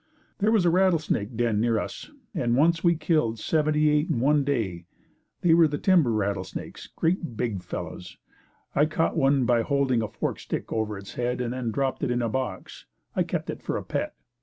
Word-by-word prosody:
There 210 +2 +3
was 215 -5 +3
a 170 - +4
rattlesnake 165 - +1
den 115 -3 +1
near 115 0 +2
us - - -5 0.2
and 120 - 0
once 165 +3 +3
we 170 -1 +4
killed 155 -8 +1
seventy 150 +4 +1
eight 150 +4 +1
in 135 - 0
one 145 +3 +3
day. 100 -11 -2 0.5
They 170 -2 +4
were 165 -1 +6
the 145 -1 -3
timber 170 -10 +3
rattlesnakes 100 -3 -3
great 165 - -1
big 110 -6 -2
fellows. 90 +1 -7 0.6
I 150 +2 +3
caught 160 +1 0
one 135 -4 +3
by 120 -1 +3
holding 135 -1 +1
a 110 - -2
forked - - -4
stick - - -4
over 110 -2 -1
its 100 0 -10
head 125 0 -2
and 125 -1 -2
then 125 -2 -3
dropped 135 +4 -1
it - - 0
in 120 0 0
a 115 - 0
box. 110 -5 -5 0.3
I - - +2
kept - - -2
it - - -9
for - - -2
a - - -5
pet. - - -3
130 Hz, 200 wpm, -26 LUFS, 110-155 Hz, 0.6 s, were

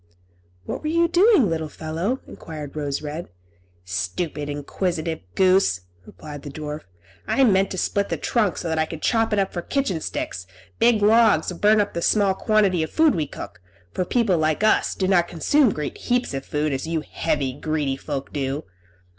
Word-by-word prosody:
"What - - -4
were 305 - -4
you 335 +1 +3
doing, 360 - +5
little 160 -2 -2
fellow?" 165 - -3
enquired 150 -3 -8
Rose 145 -1 -3
Red. 155 +3 -5 0.6
"Stupid, 115 - -3
inquisitive 160 +3 -2 0.2
goose!" 185 - +3 0.3
replied 145 +9 -9
the 145 - -8
dwarf; 150 +1 -6 0.4
"I 270 - +3
meant 195 -5 +4
to 185 - -5
split 200 +3 0
the - - -1
trunk, 215 -6 0
so 175 - -4
that 160 -1 0
I 155 - +1
could 160 -1 -8
chop 225 -1 +2
it 210 - +1
up 195 -1 0
for 175 - -3
kitchen 195 - -1
sticks; 90 - -4 0.3
big 230 -3 +4
logs 215 -6 +4
would 170 - -12
burn 215 +1 +5
up 205 -1 0
the 170 - -3
small 200 +1 +3
quantity 200 -3 +2
of 160 - -2
food 315 -2 +4
we 155 -5 -1
cook, 110 - -9 0.3
for 185 - 0
people 200 -3 +1
like 155 +4 +1
us 215 - +3
do 190 - 0
not 175 -3 +3
consume 240 - +3
great 150 -4 -5
heaps 245 - 0
of 135 0 -5
food, 150 0 -1
as 135 +3 -3
you 165 -1 -1
heavy, 145 -5 -1
greedy 145 -1 -1
folk 135 0 -5
do. 140 0 -2
170 Hz, 190 wpm, -23 LUFS, 150-210 Hz, 0.6 s, doing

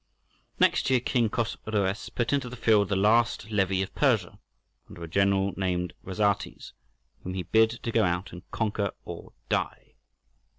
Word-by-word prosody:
Next - - +3
year 130 -1 +4
King 120 -2 +1
Chosroës 105 -3 -2
put 120 +2 0
into 135 -3 0
the 125 - -8
field 110 -4 +3
the 100 - +1
last 110 +2 +2
levy 95 -2 +1
of 95 - -8
Persia, - - +1 0.5
under 85 - -10
a - - -5
general 100 +2 +2
named 90 -2 -1
Rhazates, 100 +1 -1 0.5
whom 90 0 -5
he 95 - -2
bid 110 +3 +4
to 115 0 -5
go 115 -1 +3
out 90 +1 -1
and 90 - -8
"conquer 105 -3 -1
or - - -9
die." - - -2
100 Hz, 160 wpm, -27 LUFS, 95-115 Hz, 0.5 s, year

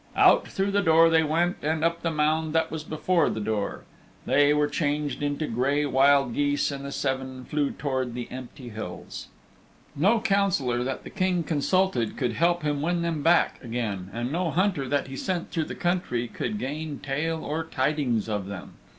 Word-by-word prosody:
Out - - +5
through 195 +1 -1
the 200 0 +2
door 165 -2 +5
they 160 0 +5
went, 165 +3 +1
and 155 +1 -1
up 170 0 +1
the 165 - 0
mound 155 0 +1
that 160 0 +1
was 160 -1 -4
before 160 +3 +1
the - - -3
door. 105 -1 -2 0.4
There 145 +3 +4
they 145 0 +1
changed 145 -1 -1
into 145 +1 -1
gray 140 +4 +1
wild 135 -2 +4
geese, 145 +2 +1
and 140 0 -6
the 140 - -5
seven 130 -2 -3
flew 150 -2 0
towards 130 -4 -2
the 120 -1 -4
empty 130 0 -8
hills. 105 -5 -7 0.7
No 200 +11 +3
councillor 190 - +1
that 130 +1 -4
the - - -9
King 185 -3 0
consulted 160 - +1
could 125 -4 0
help 170 0 +1
to 150 -1 +1
win 170 +4 -1
them 165 -3 -1
back 170 -1 +3
again, 110 -6 -3
and 120 +3 -3
no 175 +2 0
hunter 175 -6 0
that 145 - +1
he 135 - -8
sent 175 +4 -3
through 160 -3 -1
the - - -6
country 175 -10 -1
could 210 - -4
gain 150 -2 -4
tale 160 +4 -2
or 160 +2 -2
tidings 130 -7 0
of 105 -3 -2
them. 100 -2 -8
145 Hz, 185 wpm, -26 LUFS, 130-165 Hz, 0.7 s, Out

